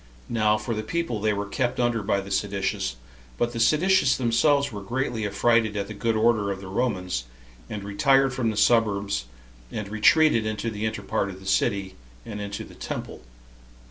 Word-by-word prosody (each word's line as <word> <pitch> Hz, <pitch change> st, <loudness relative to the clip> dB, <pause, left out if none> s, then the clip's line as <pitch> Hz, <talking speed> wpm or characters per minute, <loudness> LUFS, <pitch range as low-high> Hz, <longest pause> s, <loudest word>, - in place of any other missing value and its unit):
Now 105 Hz, -2 st, +2 dB
for 110 Hz, +2 st, -3 dB
the 110 Hz, -, -2 dB
people, 120 Hz, -2 st, -2 dB
they 110 Hz, 0 st, +2 dB
were 100 Hz, 0 st, -2 dB
kept 120 Hz, +4 st, -2 dB
under 120 Hz, -2 st, +1 dB
by 100 Hz, -1 st, 0 dB
the 100 Hz, 0 st, -9 dB
seditious; 95 Hz, -10 st, -1 dB, 0.4 s
but 120 Hz, 0 st, 0 dB
the 115 Hz, -, -4 dB
seditious 155 Hz, +5 st, +4 dB
themselves 140 Hz, +4 st, +2 dB
were 105 Hz, -2 st, -6 dB
greatly 115 Hz, 0 st, -2 dB
affrighted 110 Hz, +1 st, +2 dB
at 100 Hz, -1 st, -2 dB
the -, -, -5 dB
good 115 Hz, +2 st, -1 dB
order 110 Hz, -2 st, +2 dB
of 95 Hz, -, -4 dB
the 95 Hz, -, -10 dB
Romans, 95 Hz, -, -1 dB, 0.4 s
and 105 Hz, -2 st, -5 dB
retired 135 Hz, +7 st, +3 dB
from 125 Hz, -2 st, 0 dB
the 110 Hz, -, -3 dB
suburbs, 100 Hz, -, +2 dB, 0.5 s
and 105 Hz, -2 st, -5 dB
retreated 115 Hz, +4 st, +4 dB
into 110 Hz, +1 st, -2 dB
the 110 Hz, +1 st, -2 dB
inner 110 Hz, -2 st, -4 dB
part 100 Hz, -, -1 dB
of 95 Hz, -1 st, -9 dB
the 95 Hz, -, -14 dB
city, 95 Hz, 0 st, 0 dB, 0.3 s
and 105 Hz, -1 st, -6 dB
into 100 Hz, 0 st, -5 dB
the -, -, -13 dB
temple. -, -, -6 dB
110 Hz, 185 wpm, -25 LUFS, 100-120 Hz, 0.5 s, seditious